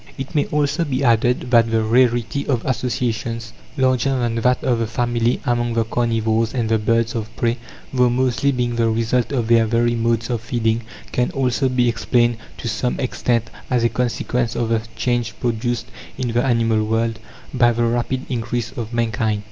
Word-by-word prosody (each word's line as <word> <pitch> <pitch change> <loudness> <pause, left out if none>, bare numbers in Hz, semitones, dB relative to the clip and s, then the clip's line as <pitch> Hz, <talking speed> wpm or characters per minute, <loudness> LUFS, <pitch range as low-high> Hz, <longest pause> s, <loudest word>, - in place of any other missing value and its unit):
It 135 -1 -6
may 145 - +1
also 150 +3 0
be 140 -3 -1
added 120 +1 +2
that 115 -2 +5
the 115 -1 +1
rarity 120 +3 +2
of 125 -5 0
associations 115 -2 -2 0.2
larger 130 0 +2
than 120 -2 0
that 125 +2 +1
of 120 -3 +1
the 115 - 0
family 120 0 0
among 120 -1 0
the 115 - +3
carnivores 115 0 0
and 120 -3 0
the 110 0 +2
birds 115 +1 +1
of 110 -2 -3
prey, 120 +1 0 0.3
though 125 -1 +4
mostly 130 +3 +1
being 120 -2 -1
the 115 -1 +2
result 115 +2 0
of 120 -5 0
their 115 -1 +4
very 120 +1 +2
modes 115 0 0
of 120 -2 -1
feeding, 115 -1 0 0.3
can 125 0 +1
also 130 0 +1
be 125 -1 +2
explained 120 0 +1 0.2
to - - -5
some 125 +1 -1
extent 120 -2 -1 0.2
as 125 -2 +1
a 115 - +4
consequence 120 0 -1
of 115 -1 -1
the 115 -1 +1
change 120 -3 -1
produced 120 -1 -1 0.3
in 125 -2 -2
the 120 +1 +1
animal 115 -4 +2
world 115 +1 0 0.3
by 120 -2 +4
the 120 0 0
rapid 120 +3 -1
increase 120 -1 -2
of 115 -1 -6
mankind. 110 -2 0
120 Hz, 180 wpm, -20 LUFS, 115-125 Hz, 0.3 s, that